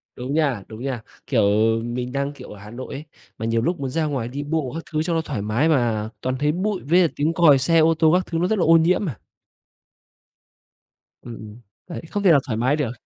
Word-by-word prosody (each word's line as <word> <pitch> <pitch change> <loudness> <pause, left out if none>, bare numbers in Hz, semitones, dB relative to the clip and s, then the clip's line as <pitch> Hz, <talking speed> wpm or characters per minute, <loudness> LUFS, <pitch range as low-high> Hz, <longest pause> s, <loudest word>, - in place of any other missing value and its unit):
Đúng 125 +3 -5
nha, 140 -10 0
đúng 110 +2 -9
nha. 130 -4 -3 0.3
Kiểu, - - +2 0.4
mình 125 +1 -4
đang, 140 +1 -2
kiểu, - - -12
ở 105 - -11
Hà 105 +1 -11
Nội 130 +3 -8
ấy, 140 +3 -6 0.3
mà 110 - -4
nhiều 115 0 +1
lúc 170 +7 -1
muốn 135 -2 -3
ra 160 +3 -1
ngoài 135 -6 -2
đi 140 +4 -5
bộ 145 -4 -2
các 165 - -5
thứ 155 0 0
cho 170 - -1
nó 165 - +1
thoải 140 -10 -4
mái 115 +10 +1
mà 115 -7 +1
toàn 130 0 -1
thấy 150 +1 +2
bụi 195 +3 -2
với 175 +5 +4
lại 170 -4 +4
tiếng 150 +3 0
còi 160 -5 +6
xe 165 +5 +2
ô 160 +1 +4
tô 160 -1 +5
các 180 0 +2
thứ 165 - -3
nó 175 - +1
rất 215 0 0
là - - +2
ô 165 +1 +6
nhiễm 180 +5 +2
mà. 135 - -5 2.0
Ừm, 120 -2 -9
ừm, 110 +2 -11 0.3
đấy, 170 - -6
không 205 0 -2
thể 180 - +6
nào 145 - +6
thoải 110 -4 -2
mái 130 +5 +2
được. 145 -6 -2
145 Hz, 250 wpm, -22 LUFS, 120-165 Hz, 2.0 s, còi